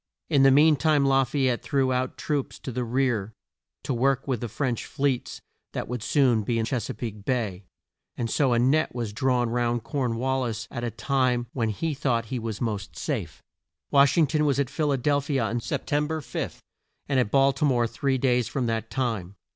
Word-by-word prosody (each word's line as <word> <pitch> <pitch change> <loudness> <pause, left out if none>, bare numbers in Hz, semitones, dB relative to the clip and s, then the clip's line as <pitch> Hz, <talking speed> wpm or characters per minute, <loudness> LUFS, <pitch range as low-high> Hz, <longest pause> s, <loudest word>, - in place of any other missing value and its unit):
In 140 -3 +5
the 135 - +7
mean 150 +3 +6
time 150 -2 +3
La 135 0 +4
fay 135 +1 0
ette 120 -2 0
threw 135 -2 +1
out 125 0 -2
troops 145 -3 -2
to 130 - -6
the 125 +1 -2
rear, 120 -4 0 0.5
to - - -2
work 135 +2 +1
with 130 -5 -1
the 120 - -2
French 125 0 -2
fleets 135 -3 -2 0.3
that - - -3
would 125 -1 -4
soon 125 -2 +3
be 115 +3 -1
in 115 - 0
Ches 120 -1 -2
a - - -4
peake 105 -4 -6
Bay, 105 -7 -2 0.5
and 120 - -1
so 130 +3 +2
a - - +3
net 135 +4 +2
was 115 -4 -3
drawn 125 0 +1
round 120 -1 0
Corn 125 -2 -1
wal 130 +2 0
lis 115 -3 -3
at 120 -2 -5
a 120 - 0
time 125 0 0
when 115 -4 0
he 155 +9 -2
thought 120 -4 0
he 125 - -1
was 110 -2 -4
most 105 -5 -3
safe. - - -4 0.5
Wash 140 +2 +5
ing 165 - +6
ton 150 +1 0
was 140 -2 +2
at 140 -1 0
Phil 150 0 0
a 135 - +2
del 145 +3 +1
phi 140 +1 -3
a - - +1
on 115 +2 -1
Sep - - -3
tem 145 +1 +1
ber 160 0 -2
5, 120 -6 -5 0.4
and 135 -2 +2
at 125 - +1
Bal 135 +3 +4
ti 135 - -3
more 125 -5 +3
three 135 +3 -1
days 125 -2 +2
from 130 -3 -2
that 115 -1 -2
time. 110 -8 -2
125 Hz, 225 wpm, -26 LUFS, 115-140 Hz, 0.5 s, the